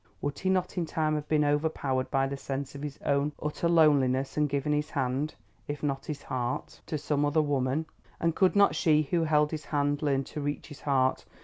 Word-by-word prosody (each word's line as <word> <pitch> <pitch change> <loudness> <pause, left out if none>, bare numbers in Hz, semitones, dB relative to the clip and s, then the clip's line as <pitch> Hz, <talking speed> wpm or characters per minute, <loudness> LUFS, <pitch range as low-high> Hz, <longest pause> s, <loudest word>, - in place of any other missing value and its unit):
Would 145 +5 -3
he 190 - 0
not 185 -1 0
in 170 - -1
time 155 0 0
have 150 -1 -2
been 150 -1 +3
overpowered 145 -3 0
by 135 0 +2
the 135 +1 -3
sense 135 0 -4
of 140 - -8
his 145 -1 -5
own 145 +1 +1
utter 150 +3 -1
loneliness 140 -5 +3
and 150 -1 +2
given 140 +2 0
his 150 +1 0
hand, 135 +1 -1 0.3
if 145 0 -5
not 135 -2 -2
his 150 -2 -5
heart, 125 -1 -3
to 155 - -2
some 145 0 0
other 145 +2 +2
woman? 140 +1 0 0.3
And 165 -1 +1
could 190 0 +3
not 200 0 +5
she 155 -3 +3
who 165 +3 0
held 150 -1 +3
his 155 -2 -5
hand 145 -1 0
learn 140 -3 +1
to 150 - -6
reach 145 +2 -3
his 145 - -11
heart? 130 -2 +1
145 Hz, 215 wpm, -29 LUFS, 140-155 Hz, 0.3 s, not